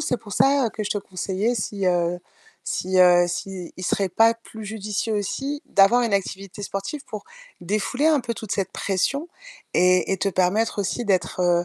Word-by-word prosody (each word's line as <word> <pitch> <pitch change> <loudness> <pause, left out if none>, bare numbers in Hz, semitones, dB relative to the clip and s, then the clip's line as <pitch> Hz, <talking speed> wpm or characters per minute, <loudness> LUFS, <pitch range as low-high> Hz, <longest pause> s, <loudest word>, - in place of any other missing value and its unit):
c'est 250 - 0
pour 210 -4 -11
ça, 275 +5 +4
heu, 225 - -3
que 215 - -5
je - - -4
te 205 - 0
conseillais 195 +4 -2
si, 200 -4 -3
heu 175 -1 +1 0.5
si, 185 0 -1
heu, 175 -1 +6
s'il 185 -1 -5
serait 195 +1 +1
pas 225 +5 +4
plus 220 -1 -11
judicieux 215 +1 -3
aussi 270 +8 -2
d'avoir 200 +5 +5
une 230 -4 +1
activité 195 0 -3
sportive 200 +9 -4
pour 215 - -7 0.4
défouler 215 - 0
un 305 -4 +4
peu 235 -1 -3
toute 220 -3 -6
cette 195 -2 -2
pression 275 - -1 0.5
et 180 +1 +4
et - - +1
te 195 - 0
permettre 195 +5 +1
aussi 220 +4 -2
d'être, 185 -3 0
heu, 175 -1 +3
200 Hz, 185 wpm, -23 LUFS, 185-225 Hz, 0.5 s, heu